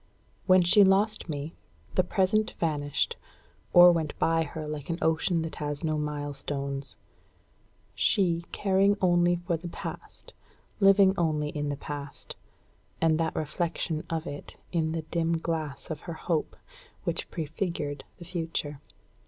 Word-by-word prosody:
When 185 Hz, -1 st, +6 dB
she 200 Hz, +4 st, +7 dB
lost 195 Hz, 0 st, +2 dB
me, 150 Hz, +2 st, -4 dB, 0.4 s
the 185 Hz, -, +3 dB
Present 195 Hz, +4 st, +1 dB
vanished, 145 Hz, -3 st, 0 dB, 0.5 s
or 175 Hz, 0 st, +9 dB
went 160 Hz, -3 st, -1 dB
by 165 Hz, 0 st, +2 dB
her 155 Hz, 0 st, -4 dB
like 150 Hz, -1 st, -5 dB
an 165 Hz, -, -1 dB
ocean 160 Hz, +1 st, +1 dB
that 160 Hz, -, -6 dB
has 145 Hz, +1 st, -3 dB
no 155 Hz, -1 st, +1 dB
milestones; 145 Hz, -2 st, -4 dB, 1.0 s
she 170 Hz, -4 st, +2 dB
caring 195 Hz, +1 st, +3 dB
only 175 Hz, -1 st, +4 dB
for 175 Hz, -1 st, -2 dB
the 175 Hz, +2 st, -7 dB
Past, 170 Hz, -, -8 dB, 0.5 s
living 195 Hz, -1 st, +6 dB
only 155 Hz, -3 st, +1 dB
in 145 Hz, -1 st, -3 dB
the 145 Hz, -, -2 dB
Past, 145 Hz, 0 st, -7 dB, 0.6 s
and 160 Hz, -1 st, +3 dB
that 160 Hz, -1 st, 0 dB
reflection 160 Hz, 0 st, -2 dB
of 160 Hz, -1 st, -2 dB
it 145 Hz, -3 st, -8 dB
in 160 Hz, -2 st, 0 dB
the 165 Hz, -1 st, -2 dB
dim 165 Hz, +1 st, 0 dB
glass 160 Hz, -3 st, -4 dB
of 155 Hz, -, -4 dB
her -, -, -2 dB
hope, 160 Hz, -1 st, -2 dB, 0.5 s
which -, -, -2 dB
prefigured 155 Hz, -2 st, -3 dB
the 175 Hz, -, -10 dB
Future. 160 Hz, -4 st, -3 dB
165 Hz, 140 wpm, -28 LUFS, 150-175 Hz, 1.0 s, or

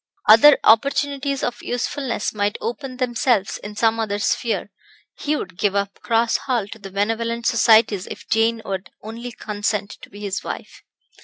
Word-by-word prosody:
Other 225 Hz, +7 st, +8 dB
opportunities 280 Hz, +3 st, +2 dB
of 240 Hz, 0 st, -3 dB
usefulness 245 Hz, -1 st, -2 dB
might 205 Hz, -1 st, -1 dB
open 255 Hz, +2 st, -5 dB
themselves 240 Hz, -4 st, 0 dB
in 210 Hz, 0 st, -9 dB
some 225 Hz, +1 st, +2 dB
other 210 Hz, -2 st, -1 dB
sphere; 220 Hz, +3 st, -1 dB, 0.5 s
he 300 Hz, +1 st, 0 dB
would 180 Hz, -10 st, -6 dB
give 200 Hz, -1 st, +1 dB
up 200 Hz, 0 st, -2 dB
Cross 230 Hz, 0 st, +1 dB
Hall 240 Hz, -7 st, -2 dB
to 225 Hz, -, -10 dB
the 195 Hz, -1 st, -9 dB
benevolent 225 Hz, +4 st, -1 dB
societies 220 Hz, -4 st, +4 dB
if -, -, -9 dB
Jane 225 Hz, 0 st, +1 dB
would 190 Hz, -1 st, -4 dB
only 230 Hz, +3 st, -7 dB
consent 205 Hz, -2 st, -3 dB
to -, -, -12 dB
be 205 Hz, -, -12 dB
his 200 Hz, -2 st, -3 dB
wife. -, -, -7 dB
225 Hz, 160 wpm, -21 LUFS, 205-240 Hz, 0.5 s, Other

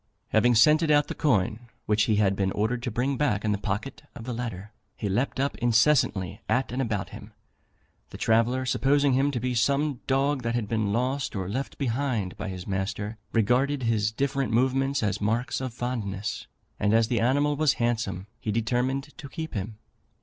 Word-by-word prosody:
Having 120 Hz, +2 st, +4 dB
scented 155 Hz, +7 st, +5 dB
out 145 Hz, -1 st, +4 dB
the -, -, -2 dB
coin 120 Hz, -, 0 dB, 0.2 s
which 105 Hz, 0 st, +2 dB
he 110 Hz, -, +2 dB
had 100 Hz, -2 st, +2 dB
been 95 Hz, -1 st, 0 dB
ordered 115 Hz, +4 st, -1 dB
to 120 Hz, -, -2 dB
bring 125 Hz, +4 st, -1 dB
back 110 Hz, -8 st, 0 dB
in 105 Hz, -, +2 dB
the 105 Hz, -, 0 dB
pocket 105 Hz, +7 st, -4 dB
of 115 Hz, -, -8 dB
the 125 Hz, +1 st, -4 dB
latter, 110 Hz, -4 st, -5 dB, 0.2 s
he 105 Hz, -, -4 dB
leaped 120 Hz, +8 st, -1 dB
up 140 Hz, +1 st, 0 dB
incessantly 120 Hz, -, +2 dB
at 130 Hz, -1 st, +1 dB
and 130 Hz, +2 st, -1 dB
about 105 Hz, -7 st, -2 dB
him. -, -, -11 dB, 0.8 s
The -, -, -9 dB
traveller, 120 Hz, +3 st, +2 dB
supposing 140 Hz, +2 st, +2 dB
him 135 Hz, +2 st, +3 dB
to 135 Hz, -4 st, -2 dB
be 125 Hz, +2 st, -1 dB
some 140 Hz, +3 st, +1 dB
dog 135 Hz, +1 st, +1 dB
that 115 Hz, 0 st, -2 dB
had 115 Hz, -4 st, -1 dB
been 110 Hz, -2 st, 0 dB
lost 125 Hz, +3 st, -1 dB
or 95 Hz, -2 st, -3 dB
left 130 Hz, +8 st, -4 dB
behind 120 Hz, -7 st, -1 dB
by -, -, -5 dB
his 90 Hz, -1 st, -6 dB
master, 105 Hz, +3 st, -3 dB
regarded 125 Hz, +5 st, +2 dB
his 110 Hz, -2 st, +1 dB
different 135 Hz, +2 st, -1 dB
movements 130 Hz, +2 st, +1 dB
as 105 Hz, -1 st, -1 dB
marks 120 Hz, +7 st, 0 dB
of 130 Hz, -1 st, -3 dB
fondness; 110 Hz, -4 st, -4 dB, 0.3 s
and 105 Hz, +1 st, +2 dB
as 115 Hz, -1 st, +4 dB
the 120 Hz, 0 st, 0 dB
animal 145 Hz, +5 st, +2 dB
was 150 Hz, -1 st, +3 dB
handsome, 115 Hz, -6 st, -1 dB
he 110 Hz, -, -2 dB
determined 125 Hz, +6 st, -1 dB
to 140 Hz, -, -8 dB
keep 160 Hz, +2 st, -6 dB
him. 105 Hz, +1 st, -4 dB
120 Hz, 190 wpm, -26 LUFS, 105-135 Hz, 0.8 s, scented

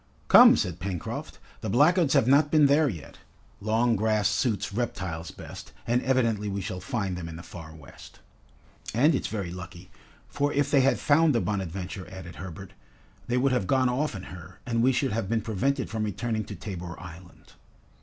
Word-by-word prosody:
"Come," -, -, +9 dB
said 85 Hz, -2 st, -2 dB
Pencroft, 90 Hz, -2 st, -5 dB, 0.2 s
"the -, -, -3 dB
blackguards 150 Hz, -, +4 dB
have 115 Hz, -, +4 dB
not 140 Hz, +3 st, +5 dB
been 155 Hz, -1 st, +5 dB
there 145 Hz, +1 st, +4 dB
yet. 85 Hz, -, -9 dB, 0.4 s
Long 115 Hz, +3 st, +1 dB
grass 105 Hz, -1 st, +1 dB
suits 105 Hz, -2 st, -1 dB
reptiles 90 Hz, -8 st, -3 dB
best, -, -, -10 dB
and 120 Hz, +1 st, +1 dB
evidently 115 Hz, -6 st, +1 dB
we 100 Hz, 0 st, -3 dB
shall 95 Hz, -1 st, -5 dB
find 95 Hz, -1 st, -3 dB
them 85 Hz, -2 st, -6 dB
in 80 Hz, -, -8 dB
the 85 Hz, -, -9 dB
Far 80 Hz, -3 st, -10 dB
West." 75 Hz, -4 st, -14 dB, 0.8 s
"And 145 Hz, +8 st, +4 dB
it's 135 Hz, -, -1 dB
very 100 Hz, -5 st, -4 dB
lucky, 90 Hz, 0 st, -10 dB, 0.4 s
for 145 Hz, 0 st, -1 dB
if 140 Hz, 0 st, +1 dB
they 140 Hz, -, +5 dB
had 135 Hz, +1 st, +3 dB
found 155 Hz, -1 st, +3 dB
the -, -, +3 dB
'Bonadventure'," 95 Hz, -3 st, -4 dB
added 90 Hz, -3 st, -10 dB
Herbert, 95 Hz, +2 st, -9 dB, 0.5 s
"they 125 Hz, -, 0 dB
would 135 Hz, +2 st, +2 dB
have 120 Hz, -7 st, 0 dB
gone 130 Hz, +3 st, +3 dB
off 135 Hz, +1 st, -1 dB
in 95 Hz, -, -7 dB
her, 90 Hz, 0 st, -11 dB
and 115 Hz, -1 st, 0 dB
we 130 Hz, +3 st, +4 dB
should 130 Hz, +1 st, 0 dB
have 105 Hz, -3 st, -2 dB
been 115 Hz, -1 st, +1 dB
prevented 130 Hz, +6 st, -1 dB
from 110 Hz, -1 st, -2 dB
returning 110 Hz, +1 st, -2 dB
to 105 Hz, -, -8 dB
Tabor 90 Hz, -3 st, -7 dB
Island." 90 Hz, 0 st, -13 dB
105 Hz, 185 wpm, -27 LUFS, 90-130 Hz, 0.8 s, Come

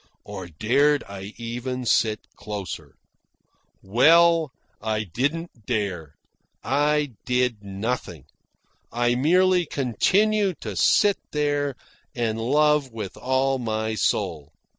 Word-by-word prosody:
Or 95 Hz, -2 st, -8 dB
dared 135 Hz, -, +2 dB
I 100 Hz, +1 st, -9 dB
even 120 Hz, +2 st, -4 dB
sit 110 Hz, -2 st, +2 dB
closer? 100 Hz, -4 st, -7 dB, 0.9 s
Well, 165 Hz, -, +5 dB, 0.3 s
I 110 Hz, 0 st, -1 dB
didn't 130 Hz, -, -3 dB
dare. 95 Hz, -, -3 dB, 0.5 s
I 145 Hz, 0 st, +1 dB
did 125 Hz, -4 st, 0 dB
nothing. 100 Hz, -, -4 dB, 0.7 s
I 120 Hz, +1 st, +1 dB
merely 180 Hz, +6 st, +3 dB
continued 190 Hz, -, +1 dB
to 105 Hz, -3 st, -5 dB
sit 200 Hz, -, +4 dB
there 145 Hz, -2 st, 0 dB, 0.4 s
and 115 Hz, -2 st, -1 dB
love 150 Hz, +3 st, +2 dB
with 110 Hz, -4 st, -6 dB
all 130 Hz, +1 st, 0 dB
my 110 Hz, -2 st, -2 dB
soul. 80 Hz, -7 st, -1 dB
125 Hz, 100 wpm, -24 LUFS, 110-150 Hz, 0.9 s, Well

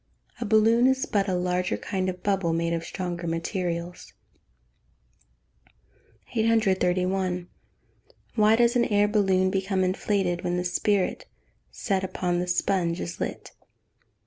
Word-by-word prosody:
A 235 Hz, -, -3 dB
balloon 225 Hz, +3 st, +4 dB
is 265 Hz, 0 st, +1 dB
but 200 Hz, -1 st, 0 dB
a 185 Hz, -, 0 dB
larger 180 Hz, 0 st, -1 dB
kind 185 Hz, -1 st, -2 dB
of 180 Hz, -1 st, -7 dB
bubble, 195 Hz, -5 st, +1 dB
made 170 Hz, 0 st, 0 dB
of 165 Hz, 0 st, -2 dB
stronger 175 Hz, 0 st, -5 dB
materials. 170 Hz, +1 st, -4 dB, 2.2 s
831. 190 Hz, -5 st, +1 dB, 0.9 s
_Why 215 Hz, 0 st, +4 dB
does 240 Hz, +1 st, +3 dB
an 240 Hz, -, +3 dB
air 205 Hz, -2 st, +3 dB
balloon 190 Hz, -3 st, +2 dB
become 190 Hz, -1 st, 0 dB
inflated 185 Hz, -1 st, 0 dB
when 175 Hz, -1 st, -1 dB
the 180 Hz, -, -1 dB
spirit 205 Hz, -, 0 dB, 0.4 s
set 195 Hz, -3 st, -2 dB
upon 180 Hz, -1 st, -1 dB
the 180 Hz, -, -2 dB
sponge 175 Hz, -1 st, 0 dB
is 85 Hz, -, -5 dB
lit? -, -, -5 dB
185 Hz, 125 wpm, -26 LUFS, 180-205 Hz, 2.2 s, balloon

